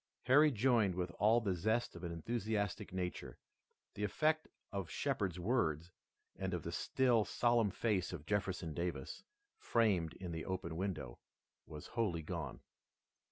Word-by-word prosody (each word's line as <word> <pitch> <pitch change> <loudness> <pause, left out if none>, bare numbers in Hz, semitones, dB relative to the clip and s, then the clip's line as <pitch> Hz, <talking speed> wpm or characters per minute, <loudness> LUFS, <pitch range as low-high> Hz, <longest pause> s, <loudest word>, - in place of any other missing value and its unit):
Harry 145 +5 +6
joined 115 -6 +3
with 90 -1 -2
all 110 +4 +5
the 100 -5 0
zest 110 +7 0
of 85 - -9
an 85 - -3
enthusiastic 105 +2 -2
nature. 90 -1 -4 0.6
The 105 - -4
effect 155 +9 +1 0.2
of 100 -5 -3
Shepard's 105 - -1
words 85 - 0 0.4
and - - -2
of - - -4
the - - -4
still, 125 -4 +2
solemn 120 -1 +2
face 100 -2 0
of 80 -4 -7
Jefferson 95 -5 -1
Davis, 85 -5 -3 0.4
framed 100 -9 +2
in 90 -2 -6
the 80 -1 -4
open 90 -3 -3
window, 80 -10 -3 0.5
was 75 -1 -8
wholly 100 -9 0
gone. 80 -5 -5
95 Hz, 145 wpm, -37 LUFS, 85-115 Hz, 0.6 s, Harry